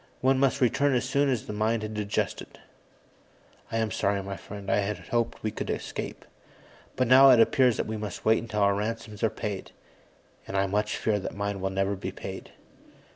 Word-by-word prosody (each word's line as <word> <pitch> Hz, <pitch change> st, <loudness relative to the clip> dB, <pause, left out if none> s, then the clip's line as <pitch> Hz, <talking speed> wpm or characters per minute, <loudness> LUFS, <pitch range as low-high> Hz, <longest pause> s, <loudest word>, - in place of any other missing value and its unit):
One 130 Hz, +1 st, +3 dB
must 135 Hz, 0 st, +2 dB
return 135 Hz, +2 st, +3 dB
as 125 Hz, 0 st, 0 dB
soon 140 Hz, +2 st, +2 dB
as 125 Hz, -4 st, -1 dB
the -, -, -5 dB
mind 110 Hz, +1 st, 0 dB
had 110 Hz, 0 st, -5 dB
adjusted. 105 Hz, -1 st, -3 dB, 1.1 s
I 115 Hz, -, -1 dB
am 110 Hz, -1 st, 0 dB
sorry, 100 Hz, +1 st, 0 dB
my 100 Hz, 0 st, -5 dB
friend; 100 Hz, 0 st, -9 dB
I -, -, +2 dB
had 105 Hz, +1 st, -1 dB
hoped 120 Hz, -1 st, -2 dB
we 110 Hz, -, -1 dB
could -, -, -5 dB
escape. -, -, -5 dB, 0.7 s
But 130 Hz, -, +1 dB
now 135 Hz, +2 st, +8 dB
it 125 Hz, -3 st, +7 dB
appears 125 Hz, 0 st, +4 dB
that -, -, -1 dB
we 110 Hz, 0 st, -4 dB
must 105 Hz, -3 st, -6 dB
wait 110 Hz, +1 st, +4 dB
until 110 Hz, -2 st, -3 dB
our 100 Hz, 0 st, +4 dB
ransoms 105 Hz, +1 st, -4 dB
are 110 Hz, -, +3 dB
paid. 105 Hz, -4 st, -5 dB, 0.7 s
And 95 Hz, -, -3 dB
I 95 Hz, -, +3 dB
much 105 Hz, +2 st, -1 dB
fear 105 Hz, -2 st, 0 dB
that 95 Hz, -, -6 dB
mine 100 Hz, -1 st, -2 dB
will 95 Hz, -, 0 dB
never 95 Hz, +1 st, 0 dB
be 95 Hz, -, -5 dB
paid." -, -, -8 dB
110 Hz, 200 wpm, -27 LUFS, 100-120 Hz, 1.1 s, now